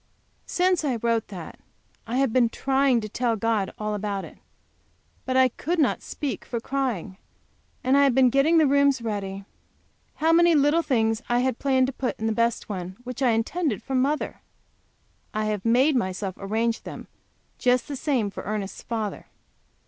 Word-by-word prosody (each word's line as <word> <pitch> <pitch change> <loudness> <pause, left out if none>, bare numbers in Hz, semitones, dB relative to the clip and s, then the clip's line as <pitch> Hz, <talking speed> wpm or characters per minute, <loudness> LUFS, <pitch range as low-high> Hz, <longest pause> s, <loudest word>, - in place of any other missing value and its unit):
Since 360 -2 +1
I 270 -5 0
wrote 230 -1 0
that 180 -5 -9 0.5
I 240 +3 -2
have 270 -4 +1
been 245 -3 +4
trying 265 -1 +2
to 215 - -5
tell 235 +2 0
God 220 -2 0
all 210 0 -3
about 205 -1 -3
it. - - -14 0.9
But 260 0 +1
I 260 0 +6
could 330 +8 -3
not 305 - +2
speak 290 -3 -4
for 235 - -4
crying. 235 -8 -3 0.7
And 260 +2 +3
I 280 - +6
have 265 -3 +2
been 260 -2 +5
getting 290 +6 +4
the 315 - +5
rooms 280 -2 +3
ready. 200 -3 -4 0.7
How 320 +2 +2
many 340 0 +5
little 295 +3 +4
things 225 -7 +1
I 240 0 +2
had 255 -2 -1
planned 260 -2 +3
to 265 - -3
put 255 0 -3
in 220 - -3
the 225 - +1
best 230 +1 0
one, 185 -2 -5
which 250 +1 -7
I 260 - +4
intended 230 - 0
for 270 - -5
mother 275 +4 0 0.9
I 215 0 0
have 210 -2 -2
made 255 +6 +3
myself 190 -4 -1
arrange 225 +3 -1
them - - -8 0.5
just 250 -1 +2
the 285 - -4
same 255 -7 0
for - - -7
Ernest's 205 -1 -4
father. 220 -3 -4
245 Hz, 180 wpm, -25 LUFS, 215-275 Hz, 0.9 s, I